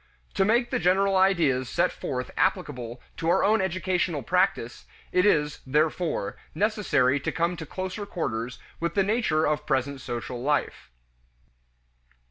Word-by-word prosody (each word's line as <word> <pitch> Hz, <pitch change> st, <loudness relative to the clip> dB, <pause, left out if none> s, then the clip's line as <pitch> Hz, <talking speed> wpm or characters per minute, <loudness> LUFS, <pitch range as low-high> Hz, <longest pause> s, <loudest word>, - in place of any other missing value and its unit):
To 195 Hz, -, +2 dB
make 235 Hz, +4 st, +2 dB
the -, -, +1 dB
general 190 Hz, +3 st, +3 dB
ideas 165 Hz, -10 st, +3 dB
set -, -, +1 dB
forth 125 Hz, -2 st, -4 dB
applicable 125 Hz, -3 st, -1 dB
to 165 Hz, -, -1 dB
our -, -, +3 dB
own 215 Hz, +1 st, +3 dB
educational 180 Hz, -4 st, -1 dB
practice, 180 Hz, -8 st, 0 dB, 0.3 s
it 180 Hz, +2 st, +3 dB
is, 150 Hz, -6 st, +2 dB
therefore, 155 Hz, -, 0 dB, 0.2 s
necessary 165 Hz, -, +2 dB
to -, -, -2 dB
come 170 Hz, +2 st, 0 dB
to 160 Hz, -2 st, -7 dB
closer 185 Hz, +4 st, -5 dB
quarters 125 Hz, -, -3 dB, 0.2 s
with 170 Hz, 0 st, -2 dB
the 195 Hz, -, +4 dB
nature 195 Hz, -7 st, +1 dB
of 150 Hz, 0 st, -1 dB
present 135 Hz, +1 st, 0 dB
social 120 Hz, 0 st, -5 dB
life. 145 Hz, +3 st, -1 dB
165 Hz, 140 wpm, -26 LUFS, 135-190 Hz, 0.3 s, the